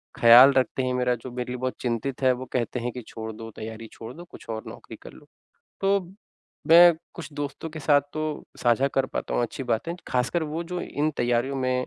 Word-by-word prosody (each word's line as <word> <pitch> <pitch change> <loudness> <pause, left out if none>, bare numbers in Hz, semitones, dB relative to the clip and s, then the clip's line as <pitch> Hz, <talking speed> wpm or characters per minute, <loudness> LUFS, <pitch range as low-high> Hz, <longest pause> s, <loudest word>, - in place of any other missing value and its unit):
ख़्याल 120 +4 +9
रखते 130 0 +1
हैं 130 0 -1
मेरा, 125 0 +1
जो 120 +2 -9
मेरे 125 0 -4
लिए 125 - -3
बहुत 130 +1 -3
चिंतित 125 +2 -2
है 130 -1 +4
वो 125 +1 -6
कहते 125 0 -1
हैं 120 +1 -3
कि 125 - -7
छोड़ 110 0 -7
दो, 115 +1 -9
तैयारी 110 +1 -8
छोड़ 115 +2 -9
दो 170 +4 -10
कुछ - - -14
और 110 0 -4
नौकरी - - -10
कर - - -11
लो। - - -16 0.6
तो 195 0 +3 0.7
मैं 170 +1 +9 0.2
कुछ 155 -3 -9
दोस्तों 145 +2 -5
के 155 - -8
साथ 145 0 +4
तो 155 - -3 0.4
साझा 120 +3 +3
कर 135 -1 +2
पाता - - -4
हूँ - - +2
अच्छी 120 +3 -4
बातें, 125 +7 -2
ख़ासकर 125 +7 0
वो 160 +2 -3
जो 180 +1 -4
इन 150 +2 -1
तैयारियों 120 +3 0
में 130 -1 0
130 Hz, 220 wpm, -25 LUFS, 120-145 Hz, 0.7 s, ख़्याल